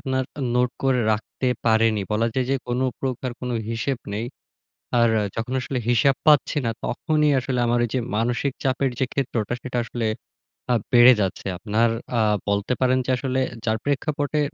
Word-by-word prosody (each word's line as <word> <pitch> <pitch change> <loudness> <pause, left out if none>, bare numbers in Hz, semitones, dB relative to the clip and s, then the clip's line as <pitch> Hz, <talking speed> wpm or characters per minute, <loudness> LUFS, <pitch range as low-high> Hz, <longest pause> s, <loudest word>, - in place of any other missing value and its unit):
আপনার 130 0 -1 0.3
নোট 125 0 +2
করে 135 -2 +2
রাখতে 110 +4 -3 0.2
পারিনি। 110 -2 +3
বলা 115 +2 +2
যায় 130 - +1
যে, - - +3
কোন 120 +1 -1 0.2
প্রকার 130 -1 -2
কোন 125 - -4 0.2
হিসেব 115 +3 -2 0.2
নেই। 110 +3 -2 0.7
আর 115 - +5 0.3
যখন 115 +3 -3
আসলে 130 - -3
হিসাব 120 +3 +4
পাচ্ছি 150 0 +4
না, 115 - +1
তখনই 150 +4 +1
আসলে 125 0 -2
আমার 120 +1 +2
ওই - - -7
যে 130 - +1 0.2
মানসিক 120 +5 0
চাপের 135 0 +1
যে 130 - +2
ক্ষেত্রটা, 120 -5 -1
সেটা 125 -1 -2
আসলে 115 0 -2 0.7
আ - - +4 0.2
বেড়ে 120 +1 +9
যাচ্ছে। 95 -1 -2
আপনার 110 +4 +1 0.3
আ - - +3 0.3
বলতে 100 +3 0
পারেন 130 0 +3
যে - - -1
আসলে 130 +1 -1 0.2
যার 110 -1 +1
প্রেক্ষাপটে 145 +1 -1
125 Hz, 170 wpm, -23 LUFS, 115-135 Hz, 0.7 s, বেড়ে